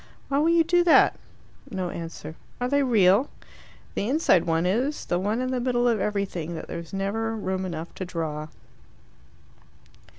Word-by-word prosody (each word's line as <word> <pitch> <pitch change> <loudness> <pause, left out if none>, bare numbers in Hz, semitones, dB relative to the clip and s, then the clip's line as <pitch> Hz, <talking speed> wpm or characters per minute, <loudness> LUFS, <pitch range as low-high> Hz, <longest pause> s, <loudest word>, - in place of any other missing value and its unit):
"Why 280 0 +2
will 315 +3 +3
you 335 0 +5
do 350 +2 +3
that?" 335 - +5 0.5
No 185 -2 -3
answer. 165 -2 -7 0.2
"Are 245 - 0
they 285 +2 +2
real?" 220 -1 +4 0.6
"The 205 - -2
inside 260 - +3
one 165 0 +1
is 250 +11 0
the 175 - 0
one 210 +5 -1
in 255 0 -2
the 255 - 0
middle 245 -1 +1
of 230 -3 +2
everything, 190 -5 -2
that 160 - -7
there's 170 -1 -7
never 220 +4 -2
room 190 -3 -2
enough 165 -1 -6
to 185 - -5
draw." 155 -3 -4
200 Hz, 165 wpm, -25 LUFS, 175-250 Hz, 0.6 s, you